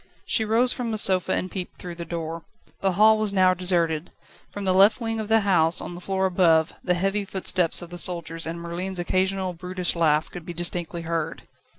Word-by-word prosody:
She 220 - +1
rose 230 +3 +2
from 245 -2 -4
the 220 - -2
sofa, 190 -3 +2
and 185 - -2
peeped 185 -2 -6
through 175 -1 -7
the 170 0 -7
door. 165 -1 -5 0.4
The 195 -1 0
hall 215 +3 +5
was 215 -2 0
now 185 -2 +4
deserted; 175 -3 0 0.4
from 205 - -7
the 185 - +2
left 200 +4 +5
wing 225 -2 -3
of 215 - -4
the 225 0 +3
house, 175 -4 +4
on - - -5
the 175 - -9
floor 190 +1 -1
above, 170 -3 +3
the 180 - +1
heavy 195 +3 -1
footsteps 185 -3 -1
of 175 - -11
the 175 - -7
soldiers 165 -2 -4
and 165 +1 -5
Merlin's 175 +3 -4
occasional 185 +1 -1
brutish 180 +1 -3
laugh 155 -2 +1
could 175 - -8
be 175 - -7
distinctly 170 0 +1
heard. 165 -1 -3
180 Hz, 210 wpm, -24 LUFS, 170-195 Hz, 0.4 s, hall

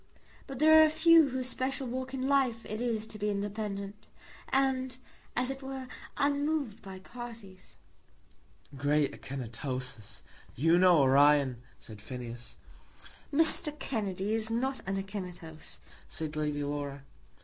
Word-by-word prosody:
But 270 - -6
there 315 +3 +7
are - - +9
a 310 - +5
few 320 -1 +6
whose 255 -1 -1
special 265 +1 -1
walk 260 +1 -4
in 265 0 -2
life 260 -5 +2
it 215 +2 -4
is 225 -3 -1
to 215 -1 -9
be 210 +1 0
independent, 205 0 -4 0.4
and, 260 -1 +1 0.4
as 250 +1 0
it 270 0 -7
were, 265 -1 -6 0.3
unmoved 285 -4 0
by 190 -1 -9
parties." 225 -2 -11 1.0
"Great 145 +1 +2
Akinetoses! 125 -2 -5 0.3
You 165 +6 +4
know 180 -2 +6
Orion," 135 -2 +4 0.2
said 110 -3 -12
Phineas. 120 +1 -7 0.7
"Mr. 300 0 +3
Kennedy 205 -6 -2
is 220 0 +1
not 260 +4 -1
an 195 0 -1
Akinetos," 180 -5 -7 0.3
said 155 -1 -5
Lady 150 -1 -1
Laura. 145 -1 -4
210 Hz, 130 wpm, -31 LUFS, -, 1.0 s, are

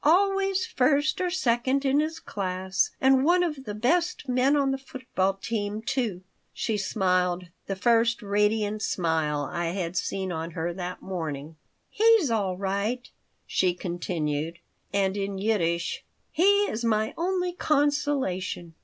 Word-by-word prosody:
Always 390 +4 +3
first 295 - +2
or 365 - +1
second 270 -5 +1
in 275 +2 +3
his 315 +1 -1
class. 190 -1 -1
And 265 0 +4
one 355 +4 +4
of 300 -6 -3
the 205 - -5
best 325 +8 +1
men 255 +3 +3
on 275 -2 +2
the 270 - -2
football 255 -8 -2
team, 205 +1 -3
too." 230 -8 -2 0.3
She 220 - -1
smiled, 185 -3 0 0.2
the 195 - -2
first 230 +3 +2
radiant 210 +1 +1
smile 160 -6 0
I 175 -1 -2
had 175 0 -3
seen 190 0 -2
on 165 0 -4
her 170 +2 -1
that 180 0 -6
morning 160 -5 -5 0.3
"He's 445 - +4
all 195 -5 0
right," 200 +6 -2 0.4
she 180 -2 +1
continued. 165 -3 -3 0.3
And 195 -1 +1
in 200 -1 -2
Yiddish, 170 -5 0 0.3
"He 400 +4 +4
is 235 - -2
my 220 -1 +1
only 360 +1 -1
consolation." 280 - 0
215 Hz, 140 wpm, -27 LUFS, 185-280 Hz, 0.4 s, And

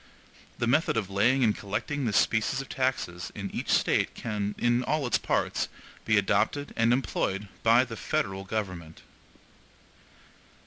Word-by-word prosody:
The 120 - 0
method 140 +2 +2
of 100 -3 -2
laying 120 +7 +3
and 110 -3 +3
collecting 125 +7 -3
this 105 -4 +1
species 115 +5 +2
of 135 - -5
taxes 130 -10 -2
in - - -5
each - - -4
State - - +2
can, 105 -2 -3
in 120 +1 +2
all 150 +2 0
its 120 - +1
parts, - - 0 0.4
be - - +3
adopted 145 0 +1
and 115 0 +3
employed 105 -5 -1
by 115 +2 +5
the 115 -2 -7
federal 95 -1 -2
government. 90 -6 -5
115 Hz, 145 wpm, -28 LUFS, 100-130 Hz, 0.4 s, by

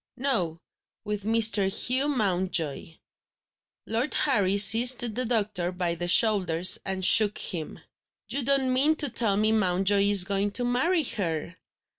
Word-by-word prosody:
"No; 190 - -3 0.5
with 210 -1 -6
Mr. 220 -3 +2
Hugh 260 +7 -1
Mountjoy." 185 - -3 0.9
Lord 235 +6 -4
Harry 200 -8 0
seized 230 +5 +5
the 250 +3 -3
doctor 210 -6 -3
by 180 -2 -3
the 175 +1 -6
shoulders, 185 -4 +3
and 190 -1 -2
shook 215 0 +5
him: 165 -5 -4 0.5
"You 280 - -2
don't 265 0 0
mean 290 +5 +1
to 295 -2 -1
tell 205 -4 0
me 215 +1 0
Mountjoy 200 -1 0
is 200 -3 +6
going 200 +1 -3
to 245 +2 -1
marry 315 +8 -1
her?" 170 - -4
205 Hz, 140 wpm, -24 LUFS, 185-245 Hz, 0.9 s, is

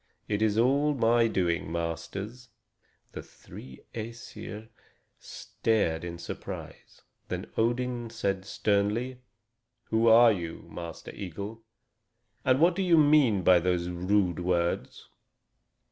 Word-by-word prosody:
It 105 0 -1
is 110 -1 +2
all 140 +5 +3
my 115 -1 +3
doing, 85 -6 -1
masters." 90 +9 -5 0.6
The - - -7
three 65 0 -13
Æsir 110 -1 -8 0.5
stared 95 -8 -1
in 85 -1 -5
surprise. 85 - -9 0.2
Then - - -4
Odin 120 +1 -1
said 100 -4 -2
sternly: 105 +6 0 0.7
"Who 110 +1 +3
are 115 +1 +8
you, 85 -4 -5
Master 85 0 -8
Eagle? 100 +4 -7 0.8
And 130 +1 +3
what 170 +2 +4
do 195 - -1
you 175 -3 +4
mean 145 -10 +4
by 90 0 +6
those 90 0 0
rude 90 0 +1
words?" 85 -1 -1
105 Hz, 115 wpm, -28 LUFS, 90-120 Hz, 0.8 s, are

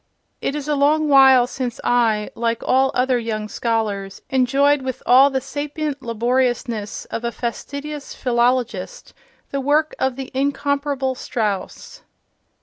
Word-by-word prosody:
It 275 - -2
is 295 -1 -5
a 300 - +1
long 300 +2 +2
while 265 -3 +7
since 250 -1 -5
I, 225 -3 +1
like 230 0 -2
all 265 +1 +3
other 250 0 +2
young 215 -2 -3
scholars, 210 -4 -2
enjoyed 275 +2 +3
with 260 -1 -5
all 265 +3 +7
the 265 -1 -1
sapient 290 +1 -4
laboriousness 240 -2 -1
of 230 - -4
a 235 - -1
fastidious 285 +5 -6
philologist 250 - -1 0.4
the 275 - -2
work 300 +3 +2
of 265 -1 0
the 265 -1 -7
incomparable 280 0 -1
Strauss. 210 -6 -4
260 Hz, 135 wpm, -21 LUFS, 235-280 Hz, 0.4 s, while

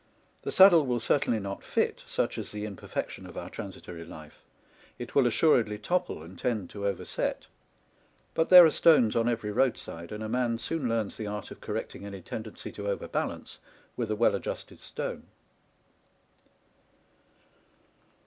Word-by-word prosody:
The - - -4
saddle 185 -4 +8
will 120 -1 +1
certainly 115 -1 +1
not 100 -1 -5
fit, - - -1
such - - -1
is - - -5
the 105 0 -4
imperfection 100 -3 -5
of - - -11
our - - -6
transitory 85 -1 -8
life; 80 -2 -12 0.6
it 120 - -7
will 135 -3 +5
assuredly 115 -5 +3
topple 175 - -1
and 90 +2 -12
tend 110 -7 -2
to 100 -1 -3
overset; 100 -3 -2 0.9
but 160 - +1
there 180 -2 +11
are 160 - +4
stones 150 -11 +5
on 115 0 +2
every 115 -3 -2
roadside, 105 -8 -1
and 105 +1 -5
a - - -3
man 120 0 0
soon 140 0 -2
learns 115 -3 -1
the 110 - -4
art 105 0 -5
of - - -11
correcting 95 - -5
any 100 -1 -7
tendency 110 +4 -7
to 100 -1 -6
over 100 - -2
balance - - -4 0.4
with 115 -3 -2
a 110 - 0
well 115 +2 +3
adjusted - - -5
stone. - - -5
110 Hz, 160 wpm, -29 LUFS, 100-125 Hz, 0.9 s, there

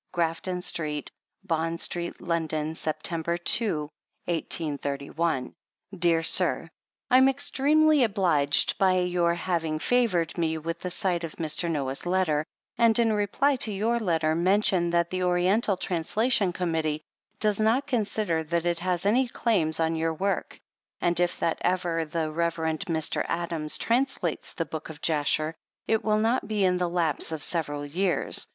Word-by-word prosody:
Grafton 175 +1 -1
St., 150 -5 -3 0.3
Bond 165 -2 -1
St., 175 +1 -3
London, 160 -2 -2
Sept. 160 +2 -3
2, 215 -8 +3 0.5
1831. 145 -3 -1 0.4
Dear 170 -2 +2
Sir: - - +1 0.4
I 255 - +7
am 265 +1 +6
extremely 290 +2 +3
obliged 180 -9 +2
by 190 -2 +4
your 175 -1 +1
having 165 -3 -1
favored 185 -5 +1
me 160 -1 0
with 165 +1 -4
the 180 - -4
sight 180 -2 -1
of 165 - -5
Mr. 160 +1 -2
Noah's 140 0 -2
letter, 175 -5 +1 0.4
and 230 -1 +5
in 230 -2 +3
reply 215 +7 +1
to 225 - -1
your 220 +4 0
letter, 165 -6 +1
mention 185 0 +2
that 170 0 +1
the 185 0 -2
Oriental 185 +3 +2
Translation 195 +4 +1
Committee 160 -4 -2 0.4
does 210 -1 +2
not 225 +6 +2
consider 210 - -1
that 170 +2 -1
it 170 -1 0
has 180 0 -1
any 245 +6 +3
claims 185 -11 0
on 165 0 +1
your 160 0 -1
work, 195 +4 -2 0.4
and 175 0 +1
if 175 0 0
that 165 - 0
ever 175 -2 0
the 160 0 -2
Rev. 170 +1 0
Mr. 160 0 -1
Adams 165 -3 0
translates 235 - -1
the 165 - -2
Book 160 0 -7
of 155 -2 -9
Jasher, 155 0 +1 0.3
it 220 -1 +1
will 215 -1 +2
not 225 +4 +1
be 210 -3 +1
in 180 -1 +2
the 180 -1 0
lapse 170 -2 0
of 155 -2 -4
several 145 -4 0
years. 175 +5 0
170 Hz, 150 wpm, -26 LUFS, 160-200 Hz, 0.5 s, I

